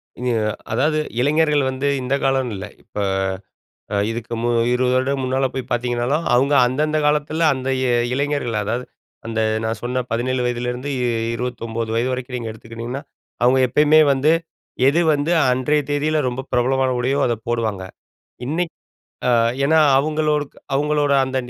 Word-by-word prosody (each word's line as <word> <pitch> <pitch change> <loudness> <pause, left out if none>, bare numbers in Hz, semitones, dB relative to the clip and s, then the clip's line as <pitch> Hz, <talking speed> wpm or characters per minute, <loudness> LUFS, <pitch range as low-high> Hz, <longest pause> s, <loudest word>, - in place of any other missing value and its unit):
அ - - -16 0.5
அதாவது 150 +7 +1 0.2
இளைஞர்கள் 150 +1 +2
வந்து, 130 +2 -2
இந்த 125 +1 -2
காலம்னு 135 -3 +1
இல்ல, 95 +1 -6 0.2
இப்ப - - -8 0.9
அ - - +1 0.2
இதுக்கு 115 0 -5
மு 120 - +1 0.2
20 125 0 +1
வருட 130 +2 0
முன்னால 130 +1 +1
போய் 130 -1 -5
பாத்தீங்கனாலும், 120 +5 0
அவுங்க 135 +4 +3
அந்தந்த 150 +5 0
காலத்தில, 150 +2 0
அந்த 130 -1 -5
இ - - 0 0.3
இளைஞர்கள். 140 -4 -1
அதாவது 120 +5 -2 0.4
அந்த 115 -1 -1 0.2
நான் 110 -1 -2
சொன்ன 125 +1 -1
17 125 +2 0
வயதிலேருந்து 125 +2 -3 0.5
29 115 -2 -4
வயது 120 +3 +1
வரைக்கும் 125 0 -4
நீங்க 115 -2 -5
எடுத்துக்கிட்டீங்கன்னா, 115 +4 -7 0.4
அவுங்க 130 +2 +4
எப்பயுமே 150 +5 +4
வந்து, 140 +3 +2 0.6
எது 155 +5 +3
வந்து 145 +3 0 0.2
அன்றைய 130 +4 +1
தேதியில 150 +2 +1
ரொம்ப 125 +1 -4
பிரபலமான 130 +2 +2
உடையோ, 135 +3 0
அதை 120 - 0
போடுவாங்க. 110 -5 -1 0.6
இன்னைக் 165 +4 -2 0.5
அ - - +3 0.4
ஏன்னா 160 +3 +4 0.2
அவுங்களோடுக் 150 0 0 0.2
அவுங்களோட 145 +1 +1
அந்த 130 0 -5
130 Hz, 140 wpm, -20 LUFS, 120-145 Hz, 0.9 s, அவுங்க